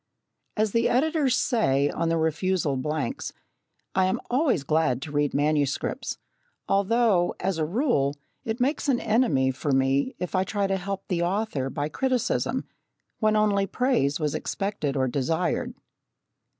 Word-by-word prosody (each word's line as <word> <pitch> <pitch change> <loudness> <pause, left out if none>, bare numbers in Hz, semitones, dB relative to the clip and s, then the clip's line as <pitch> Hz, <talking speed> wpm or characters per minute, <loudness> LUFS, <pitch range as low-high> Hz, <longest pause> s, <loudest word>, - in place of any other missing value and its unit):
As 215 -1 +2
the 230 +2 +2
editors 280 0 +2
say 140 - +2
on 165 - -1
the 165 - +1
refusal 160 -1 0
blanks, 155 - -3 0.6
"I 190 -1 +3
am 185 - 0
always 255 - +2
glad 145 -4 +1
to 145 - -7
read 145 -1 0
manuscripts," 145 -1 0 0.5
although, 200 -2 +2
as 185 -2 -1
a 155 - +1
rule, 170 - +1 0.3
it 225 +2 -3
makes 280 +3 0
an 250 -3 +3
enemy 210 - +2
for 140 +2 -3
me 135 - +1
if 180 - -5
I 185 -1 +2
try 200 +1 -1
to 195 0 0
help 195 +1 -5
the 175 -3 -1
author 175 -7 -1
by 145 +2 -2
criticism, 255 - -1 0.5
when 215 -1 +3
only 205 -2 +2
praise 240 - +1
was 150 -2 -1
expected 195 -9 -2
or 130 -1 +2
desired. 140 +5 -1
185 Hz, 150 wpm, -26 LUFS, 145-225 Hz, 0.6 s, I